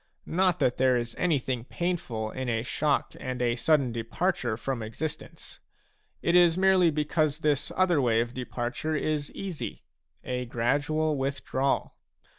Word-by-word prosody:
Not 180 0 +2
that 125 - +1
there 130 -1 +4
is 120 -1 -3
anything 135 -8 0
painful 125 -9 -3
in 130 -1 -4
a 115 -1 0
shock 145 +3 0
and 130 -2 -4
a 120 -1 +1
sudden 140 -1 +2
departure 115 +1 -1
from 125 +1 -3
existence; 115 +8 -6 0.6
it 170 - +2
is 175 -1 +6
merely 190 -2 +5
because 150 0 0
this 145 -2 +1
other 180 -5 +3
way 115 -3 +3
of 120 +1 -1
departure 130 +4 -3
is 150 -1 -1
easy, 190 -5 -5 0.2
— - - -51
a 125 -1 -3
gradual 145 +6 +1
withdrawal. 135 0 -1
140 Hz, 145 wpm, -28 LUFS, 120-155 Hz, 0.6 s, is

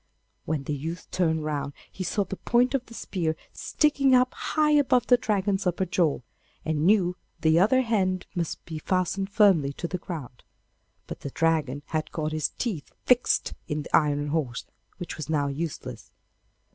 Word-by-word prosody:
When 150 -3 -1
the 150 - -3
youth 165 +5 -5
turned 160 -4 +1
round 145 -2 -2 0.2
he 185 - -5
saw 200 +3 0
the 195 - -6
point 245 +2 +2
of 270 -3 +1
the 230 - -12
spear 165 -7 -2 0.2
sticking 280 -3 +2
up 250 0 +3
high 305 -1 +1
above 265 -5 +4
the 245 - +6
Dragon's 205 -4 0
upper 180 +2 0
jaw, 170 -6 +1 0.4
and 155 +1 +1
knew 185 -4 +3 0.2
that 160 - +1
the 160 +1 +5
other 215 +8 +4
end 185 -5 0
must 170 -4 -3
be 160 -2 -6
fastened 185 +3 -1
firmly 190 -10 +4
to 170 - -4
the 180 +1 -4
ground; 150 -9 -7 0.6
but - - -7
the 140 - -5
Dragon 145 -3 0
had 155 -1 -3
got 155 -1 -2
his 155 -1 0
teeth 200 - -3
fixed 250 -1 +3
in 150 -1 -2
the - - 0
iron 145 -1 +2
horse, 145 -5 -2 0.3
which 175 -3 -6
was 155 -1 -6
now 150 -3 +1
useless. 155 +3 -5
170 Hz, 175 wpm, -26 LUFS, 155-205 Hz, 0.6 s, the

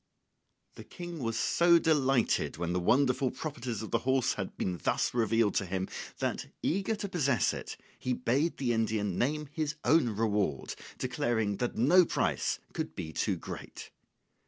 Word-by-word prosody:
] - - -48
The - - -8
King 175 -2 -8
was 115 -3 -2
so 170 0 +4
delighted 135 - +2
when 85 0 -2
the 90 - +1
wonderful 125 +6 +3
properties 130 -7 -5
of 110 - -7
the - - +2
horse 130 -1 +1
had 100 -2 -5
been 90 -2 -2
thus - - +1
revealed 115 -2 +2
to 95 - 0
him, 95 +1 -2 0.3
that, - - -2 0.2
eager 195 +5 0
to 205 -1 -4
possess 140 - +1
it, - - -6 0.2
he 125 - -1
bade 135 +7 0
the 125 -3 0
Indian 110 -4 0
name 150 +4 0
his 155 -1 -2
own 155 -6 +4
reward, 105 - -1 0.2
declaring 110 -4 -1
that 125 - -2
no 165 +11 +6
price - - 0 0.2
could - - -4
be 80 - -5
too - - 0
great. - - -8
125 Hz, 165 wpm, -30 LUFS, 105-150 Hz, 0.3 s, no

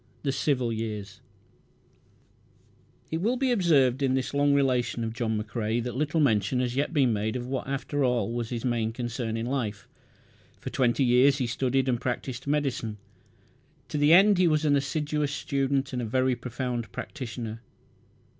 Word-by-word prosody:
The 140 - +1
Civil 130 -4 0
Years 105 -3 -5 1.9
It 160 +1 -1
will 235 +6 +1
be 265 0 +1
observed 145 - +3
in 130 -1 +2
this 130 +1 -2
long 145 0 +3
relation 125 -4 +1
of 110 0 -3
John 115 -3 -1
McCrae 110 +1 -2
that 125 0 -4
little 150 +4 0
mention 115 -3 +2
has 125 -1 -1
yet 140 +3 0
been 135 -7 +3
made 110 +2 -1
of 125 -1 -3
what 130 +1 -3
after 140 +1 -2
all 120 -4 +1
was 120 -1 -3
his 120 0 -4
main 115 -2 0
concern 120 -1 -3
in 115 - -3
life. 115 -6 -3 0.7
For - - -6
twenty 125 +1 +2
years 130 +3 +5
he 130 - 0
studied 130 +2 0
and 120 -2 0
practised 125 +1 -4
medicine. 135 -7 -1 0.9
To 150 - -2
the 145 +1 +4
end 195 +2 +7
he 180 - +5
was 155 -1 +2
an 145 -1 +4
assiduous 145 +1 -1
student 135 -1 -1
and 125 - -1
a - - -2
very 130 +3 +1
profound 120 -1 -4
practitioner. 115 -5 -6
130 Hz, 170 wpm, -27 LUFS, 115-140 Hz, 1.9 s, end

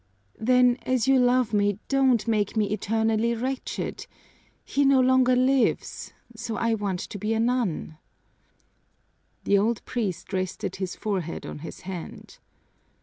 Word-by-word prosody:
"Then, 250 +1 +4
as 255 -1 0
you 270 -1 +5
love 245 -2 +2
me, 205 -1 +2
don't 265 -5 +2
make 215 -1 0
me 210 -2 +1
eternally 220 +2 0
wretched. 255 +3 -4 0.6
He 285 - +1
no 275 -1 +5
longer 255 0 +4
lives, 255 +1 +1 0.2
so 225 0 -5
I 230 0 +1
want 200 -4 -2
to 205 - -7
be 215 +3 -1
a - - 0
nun!" 225 -10 -1 1.4
The 200 - +3
old 225 +2 0
priest 195 -6 -3
rested 185 0 -3
his 190 -1 -4
forehead 185 -6 -3
on - - -7
his 165 - -9
hand. 180 -3 -8
225 Hz, 140 wpm, -26 LUFS, 200-250 Hz, 1.4 s, you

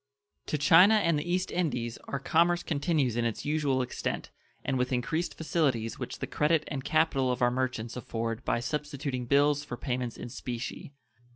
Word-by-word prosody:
To 150 - 0
China 180 +9 +7
and 170 -7 +2
the 175 +4 -3
East 185 +1 0
Indies 125 -10 -1
our 140 - -2
commerce 170 +5 +2
continues 145 -5 0
in 120 - +1
its 115 -2 -2
usual 145 -3 +1
extent, 125 - -4 0.3
and 135 - 0
with 125 0 0
increased 160 +7 -1
facilities 140 -9 0
which - - -5
the - - -3
credit 155 +1 +2
and 135 -3 -4
capital 155 -5 +2
of 125 0 -1
our 120 - +4
merchants 125 -3 -2
afford 115 -2 -3
by 120 - 0
substituting 140 -1 -3
bills 145 +2 +3
for 125 -4 -6
payments 125 -2 -3
in - - -7
specie. 125 +4 -6
140 Hz, 175 wpm, -29 LUFS, 125-155 Hz, 0.3 s, China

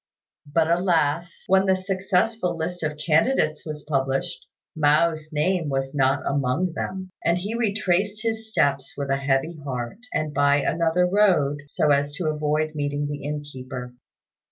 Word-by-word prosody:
But 160 +1 +3
alas! 170 -2 +1
when 190 +1 +3
the 190 - +4
successful 185 0 0
list 175 +2 -3
of 150 -1 -2
candidates 155 - +1
was 150 -1 -6
published, 135 +3 -1 0.3
Mao's 155 +1 +2
name 160 +1 0
was 135 -1 -2
not 135 -2 +2
among 140 +6 0
them; 185 +2 -5
and 170 +1 +2
he 200 +5 -4
retraced 210 -2 0
his 225 -1 -2
steps 140 -10 0
with 140 -1 -2
a 135 - +2
heavy 140 +4 0
heart, 125 - -4
and 155 -1 -2
by 145 0 +4
another 165 +4 +2
road, 180 -7 +3
so 150 +1 +1
as 145 0 +2
to 155 +1 -2
avoid 155 +1 0
meeting 145 -1 -2
the 145 -1 -5
innkeeper. 130 -4 -6
155 Hz, 150 wpm, -24 LUFS, 145-180 Hz, 0.3 s, the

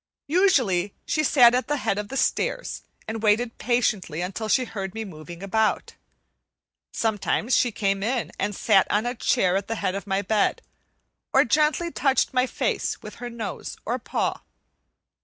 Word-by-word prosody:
Usually 240 - +3
she 310 - 0
sat 245 -5 +6
at 250 +1 0
the 295 - 0
head 200 -6 -1
of 210 - -4
the 270 - -5
stairs - - -1 0.3
and 220 0 -4
waited 225 +2 +1
patiently 215 -9 0
until 195 +5 -4
she 255 +1 +3
heard 195 -4 -6
me 225 0 -4
moving 170 0 -10
about. 215 +3 0 1.0
Sometimes 220 +2 0
she 245 - +3
came 195 -2 0
in 240 +3 -1
and 205 0 -1
sat 195 -2 +3
on 210 +3 +1
a 245 - -1
chair 185 -6 +1
at 195 0 -1
the 225 - -2
head 185 - -1
of 200 +1 -5
my 195 +1 0
bed, 215 -1 +1 0.7
or - - +5
gently 305 +6 +2
touched 270 -2 +1
my 255 0 +2
face - - -2
with - - -9
her 245 - -4
nose 225 -5 -6
or 245 +3 -1
paw. - - -2
220 Hz, 170 wpm, -25 LUFS, 195-250 Hz, 1.0 s, sat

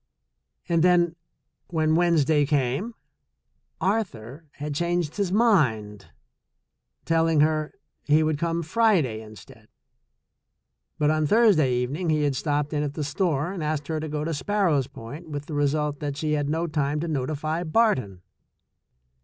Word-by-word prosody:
And 170 -2 +2
then 175 -2 +3 0.5
when 155 -2 +1
Wednes 170 -3 +3
day 145 -1 +2
came, 145 - -1 0.8
Arthur 165 - -3
had 150 0 -5
changed 170 +1 -1
his 200 -3 0
mind, 125 - +1 1.0
telling 165 -2 +2
her 155 0 0 0.3
he 150 +2 +3
would 155 -2 0
come 170 0 -1
Friday 160 - +1
instead, 110 -3 -14 1.3
but 150 0 +2
on 155 -1 +1
Thursday 200 - +4
even 125 +4 -2
ing 175 -2 -2
he 155 -1 +2
had 145 -2 0
stopped 145 +2 -1
in 150 - 0
at 145 -1 -3
the 155 - -2
store 150 +2 -1
and 185 -5 -5
asked 150 -1 -2
her 160 -1 -1
to 155 0 -5
go 150 0 -3
to 165 +1 -2
Sparrows 155 -3 +1
Point, 145 +9 -10
with 145 -1 -5
the 155 - -8
result 145 0 0
that 145 -1 -4
she 155 0 -2
had 145 -1 0
no 165 +2 0
time 150 -2 -1
to 170 - -3
notify 155 +3 -2
Barton. 145 - +1
155 Hz, 155 wpm, -25 LUFS, 145-170 Hz, 1.3 s, Thursday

